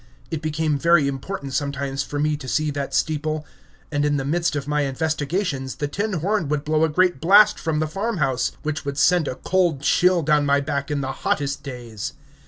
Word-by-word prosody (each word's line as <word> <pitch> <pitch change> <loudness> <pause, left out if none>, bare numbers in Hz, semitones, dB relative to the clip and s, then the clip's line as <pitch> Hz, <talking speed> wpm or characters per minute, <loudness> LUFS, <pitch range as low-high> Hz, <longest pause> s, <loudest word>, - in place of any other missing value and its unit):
It 160 -2 -3
became 155 -1 -1
very 170 -2 +4
important 140 +1 -5
sometimes 140 0 -2
for 145 +1 -4
me 150 +1 +1
to 145 -3 -8
see 155 +3 0
that 140 -1 -3
steeple; 155 0 -1 0.5
and 145 -1 0
in 145 0 +2
the 135 - -2
midst 165 +2 0
of 140 -1 -3
my 150 0 +1
investigations 145 0 -2
the 145 - -2
tin 200 +8 -2
horn 180 0 0
would 145 -1 0
blow 155 +1 +2
a 160 - +3
great 175 -1 +2
blast 200 +5 +6
from 160 -1 -1
the 155 - +1
farmhouse, 160 - -1
which 150 -1 -3
would 140 -1 -4
send 170 +1 +3
a - - -3
cold 175 -3 +1
chill 180 +4 +3
down 150 0 +3
my 140 0 +3
back 140 0 -2
in 145 -1 -1
the 135 0 -2
hottest 140 -1 -1
days. 120 -6 -6
150 Hz, 200 wpm, -23 LUFS, 140-165 Hz, 0.5 s, blast